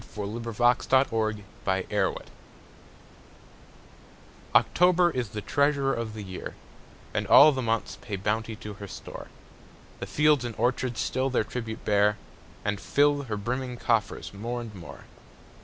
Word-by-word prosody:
Paul 105 0 -4
Laurence 120 +1 +1
Dunbar 115 -5 +2 0.4
October 95 - 0 2.4
OCTOBER 180 0 +4
is 125 -7 -2
the 105 0 -5
treasurer 140 +3 +1
of 115 -2 -4
the 105 - -6
year, 95 -2 -7 0.6
And - - -1
all 150 +2 +9
the 135 -2 -2
months 115 -2 -2
pay 105 - -4
bounty 110 +3 -2
to 105 -2 -8
her 100 0 -9
store: - - -9 0.7
The - - -5
fields 150 -3 +3
and 120 -2 -4
orchards 125 +1 0
still 130 +1 0
their 130 - +1
tribute 110 -1 -6
bear, 105 0 +3 0.5
And 100 -1 -1
fill 145 0 +2
her 110 -4 -3
brimming 125 +4 -3
coffers 110 -5 -1
more 115 +5 -4
and 115 -3 -7
more. 90 -4 -11
115 Hz, 140 wpm, -27 LUFS, 105-130 Hz, 2.4 s, all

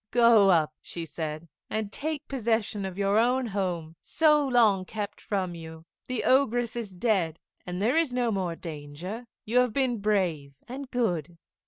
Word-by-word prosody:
"Go 230 -4 +6
up," 155 -4 +3
she 170 -1 -6
said, 155 +1 -5 0.2
"and 215 -2 -2
take 305 +2 -3
possession 225 -5 -1
of 190 -1 -6
your 200 +1 +3
own 250 +2 +2
home, 180 -6 -3
so 300 -2 +3
long 220 -7 +4
kept 205 +1 -5
from 190 -4 -2
you. 160 -1 -10 0.2
The 255 -2 -2
Ogress 245 -3 +2
is 235 -4 -4
dead, 185 -4 0 0.3
and 180 0 -3
there 235 +9 +2
is 325 -6 +1
no 245 -2 +1
more 185 -4 -1
danger. 165 +9 -7 0.2
You 235 +4 +3
have 250 -3 +2
been 255 -4 +1
brave 180 -9 0
and 265 +2 -7
good. 175 - -1
205 Hz, 165 wpm, -27 LUFS, 175-245 Hz, 0.3 s, Go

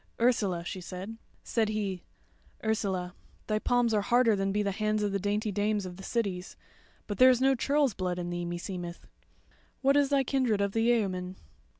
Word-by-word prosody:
"Ursula," 205 -8 +2
she 185 0 -5
said. 190 +5 -7 0.2
Said 225 -2 0
he: 200 -4 -2 0.6
"Ursula, 195 -5 -1 0.3
thy 215 0 0
palms 245 0 +2
are 210 - +3
harder 235 +1 +4
than 195 0 0
be 210 +1 +1
the 200 - 0
hands 215 +1 0
of 205 - 0
the 200 - 0
dainty 205 +2 -1
dames 205 0 0
of 180 -1 -7
the - - -9
cities, 195 -4 -3 0.5
but 205 - -5
there 255 0 +9
is 250 -2 +4
no 270 +1 +4
churls' 280 0 +2
blood 180 -2 -2
in 175 0 -3
thee 175 0 -3
meseemeth. 175 0 -5 0.8
What 275 +1 +4
is 285 -1 +4
thy 280 -1 +3
kindred 255 -5 +1
of 200 0 +1
the 225 - 0
yeoman?" 195 -6 +1
210 Hz, 190 wpm, -29 LUFS, 185-235 Hz, 0.8 s, there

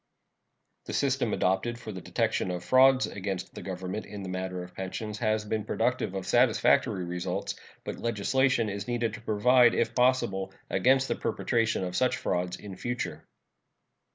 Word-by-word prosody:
The - - -6
system - - +1
adopted 95 +6 0
for 110 -2 -8
the 95 -3 -7
detection - - 0
of 90 -1 -3
frauds 130 +3 +5
against 95 -2 -5
the - - -8
Government 95 +2 -5
in 100 -2 -7
the 95 - -5
matter 95 0 -3
of 90 - -12
pensions 105 +3 -5
has 110 -2 0
been 110 0 -2
productive 115 -2 -1
of 95 -1 -3
satisfactory 115 -4 +3
results, 90 0 -3 0.3
but - - -5
legislation 115 +2 +1
is 100 -1 -4
needed 120 -3 -1
to 110 - -8
provide, 120 +3 +4
if 115 0 +1
possible, 100 -7 +1 0.2
against 130 +7 +3
the - - +1
perpetration 115 -4 0
of 90 -1 -4
such 125 +5 +2
frauds 90 0 -2
in 100 -3 -9
future. 125 +3 -4
105 Hz, 160 wpm, -28 LUFS, 95-120 Hz, 0.3 s, frauds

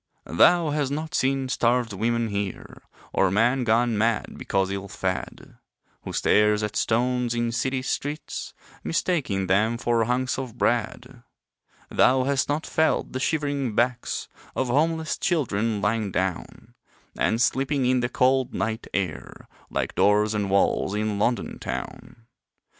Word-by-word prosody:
Thou 165 - +4
has 145 -2 0
not 155 +3 -4
seen 135 0 +1
starved 120 -2 +1
women 115 +3 0
here, 100 -2 -5 0.3
Or 95 - +3
man 120 +7 +2
gone 115 -1 +2
mad 115 0 0
because 95 -1 -1
ill 100 0 -4
fed 95 -1 -5 0.5
Who - - -5
stares 105 0 +3
at 105 0 -3
stones 120 +1 +1
in 120 0 0
city 130 +3 -1
streets, 145 +3 -4 0.3
Mistaking 145 - 0
them 105 +5 +2
for 115 -1 +1
hunks 130 +2 0
of 125 -3 -6
bread. 120 +2 -1 0.7
Thou 130 0 +4
hast 140 +1 0
not 150 +2 -1
felt 160 0 +1
the 130 - -2
shivering 140 -5 -1
backs 120 +2 0 0.3
Of 130 -1 -1
homeless 155 +2 0
children 115 - 0
lying 105 -1 0
down 95 -1 -3 0.4
And 110 - +1
sleeping 135 +2 +1
in 125 0 +3
the 120 0 -1
cold, 130 +1 +2
night 110 0 -2
air 90 -7 -4 0.2
Like - - -2
doors 105 +1 +3
and 105 -2 -1
walls 100 0 +2
in 105 -1 -1
London 120 +3 -1
town. 115 - -7
120 Hz, 140 wpm, -25 LUFS, 105-130 Hz, 0.7 s, Thou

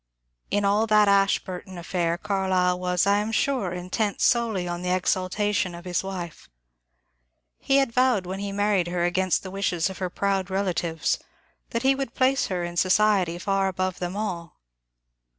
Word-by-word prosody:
In 205 0 +1
all 210 +3 +2
that 210 -1 +5
Ashburton 195 -2 +1
affair 170 -1 -1
Carlyle 185 -2 0
was, 180 0 +1
I 200 +1 +3
am 210 +2 -2
sure, 245 -5 0
intent 185 +4 -2
solely 225 -7 +1
on 175 0 -4
the 180 - -3
exaltation 185 +1 0
of 170 +1 -11
his 180 0 -1
wife. 180 -4 -7 1.1
He 275 - +2
had 270 -3 +2
vowed 250 -6 +2
when 190 +2 -5
he 200 0 -4
married 200 -3 +1
her 175 0 -1
against 185 +1 +1
the 190 - -7
wishes 190 -2 -1
of 190 - -10
her 185 -1 -2
proud 195 0 -1
rela 190 0 -1
tives 165 -2 -1 0.5
that 230 +1 -2
he 270 +1 +5
would 270 -2 -4
place 265 +1 +2
her 180 -2 -2
in 175 0 -5
society 185 -2 +3
far 195 +1 0
above 185 -1 -2
them 180 +2 -4
all. 175 -6 -4
190 Hz, 170 wpm, -25 LUFS, 180-205 Hz, 1.1 s, that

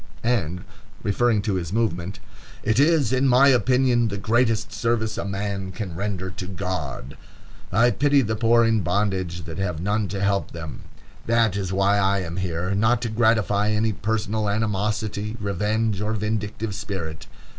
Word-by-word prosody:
And 90 -8 0 0.4
referring 105 0 +2
to 105 - 0
his 90 -3 -3
movement: 100 -3 -1 0.5
"It 110 +3 +2
is, 145 -5 +3
in 130 +1 +3
my 130 +2 +6
opinion, 125 -1 +3
the 100 -2 -3
greatest 115 +1 +1
service 110 -2 0
a - - -3
man 100 -1 -3
can 95 -3 -5
render 95 0 -3
to 90 0 -7
God." 90 -9 -4 0.6
"I 115 +5 +4
pity 140 +1 +3
the 110 0 -1
poor 115 +1 +4
in 115 -1 +2
bondage 95 -2 -1
that 85 +2 -6
have 90 -5 -2
none 105 +4 0
to 100 +1 -4
help 100 0 0
them; 80 -3 -7 0.5
that 115 -3 +3
is 95 -2 -2
why 100 +1 +2
I 100 0 +2
am 85 -1 -5
here; 90 0 -2
not 110 +4 +3
to 115 - -1
gratify 110 -2 +2
any 110 +1 +1
personal 110 0 -1
animosity, 105 +1 -1
revenge, 105 +1 -1
or 105 +1 -1
vindictive 105 0 -2
spirit. 95 -7 -5
105 Hz, 160 wpm, -24 LUFS, 95-115 Hz, 0.6 s, my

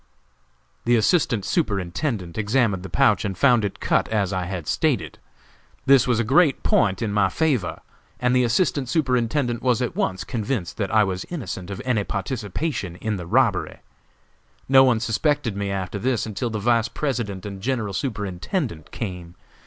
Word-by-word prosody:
"The 120 +1 +4
Assistant 115 - +2
Superintendent 100 - -1
examined 110 -3 +1
the 95 - -8
pouch 105 -3 +3
and 100 -3 -3
found 125 -5 +4
it 100 - -3
cut, - - +1
as 100 -3 0
I 90 -1 -1
had 90 -3 -5
stated. - - -1 0.7
This 135 -3 +5
was 120 -3 +2
a - - +2
great 140 +5 +3
point 100 0 +2
in 105 -2 -2
my 105 -1 +3
favor, 145 - 0 0.4
and 125 0 +2
the 125 - +4
Assistant 130 +1 +1
Superintendent 125 -3 0
was 125 -3 +2
at 125 - -2
once 95 0 -1
convinced 110 -4 -3
that 100 -3 -1
I 110 0 +4
was 95 -2 -2
innocent 95 - -6
of 100 - -6
any 120 -5 +1
participation 105 - -3
in 105 +2 -3
the 90 -2 -7
robbery. - - +1 0.9
No 135 0 +7
one 125 -4 +3
suspected 120 +1 0
me 100 0 -2
after 100 +1 -3
this 125 +1 0
until 110 +3 -3
the 110 - -3
Vice 115 +2 +2
President 115 -10 -3
and 100 -2 -7
General 110 -4 -1
Superintendent 100 - -3
came. 90 -6 -6
110 Hz, 165 wpm, -23 LUFS, 95-125 Hz, 0.9 s, No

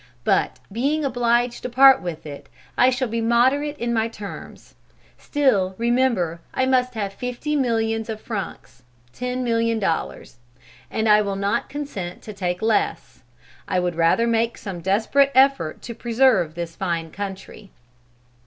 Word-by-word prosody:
But - - +1
being 280 +8 0
obliged 240 -1 +1
to - - -4
part 265 +2 +7
with 170 -3 -6
it, 145 -2 -9 0.3
I 250 - +5
shall 260 0 -1
be 230 +1 -2
moderate 260 +6 +2
in 235 -2 -2
my 225 -1 +1
terms. 210 -3 -10 0.5
Still, 205 -11 +1
remember 235 -9 +1
I 260 - +2
must 255 -1 +1
have 200 -3 -3
fifty 250 +6 -3
millions 225 -4 0
of 220 -1 -4
francs 200 - -7 0.3
($10,000,000), 230 -7 -1 0.6
and 220 0 -1
I 210 0 +6
will 200 -1 -2
not 200 +4 -1
consent 210 -12 -6
to 215 - -8
take 180 -1 -3
less. 220 -1 -1 0.5
I 185 - +1
would 180 -1 -1
rather 165 +7 +2
make 230 0 0
some 190 -4 -6
desperate 225 +9 +2
effort 265 - +3
to 235 - -6
preserve 230 -9 +2
this 170 -1 -5
fine 170 -4 -3
country." 200 +1 -7
225 Hz, 145 wpm, -22 LUFS, 195-250 Hz, 0.6 s, part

